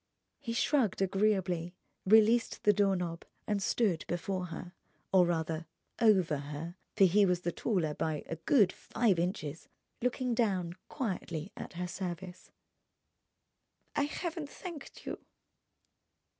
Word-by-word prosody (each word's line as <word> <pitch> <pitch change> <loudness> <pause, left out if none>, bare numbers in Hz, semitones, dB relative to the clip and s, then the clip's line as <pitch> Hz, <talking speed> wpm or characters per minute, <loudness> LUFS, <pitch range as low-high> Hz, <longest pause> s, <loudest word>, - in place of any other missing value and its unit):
He 230 - -4
shrugged 235 - +2
agreeably, 190 -3 +1 0.3
released 220 +3 +5
the 210 - +6
door 200 -1 +3
knob, 170 -2 -3 0.2
and 205 -1 0
stood 195 -5 +1
before 180 +1 -2
her, 175 +2 -7 0.4
or 180 -2 +6
rather 160 -1 -1 0.3
over 190 -9 +4
her—for 150 +7 -3
he 195 +3 +6
was 180 -2 +2
the 175 - -1
taller 170 -7 0
by 155 -1 -2
a 165 - -5
good 200 - +4
five 210 -7 +1
inches—looking 185 - -3
down, 190 -7 +1 0.2
quietly 185 - -3
at - - -7
her 180 +1 -3
service. 180 0 -6 1.5
"I 285 - +2
haven't 325 0 -4
thanked 340 -4 -9
you." - - -4
185 Hz, 120 wpm, -32 LUFS, 170-220 Hz, 1.5 s, the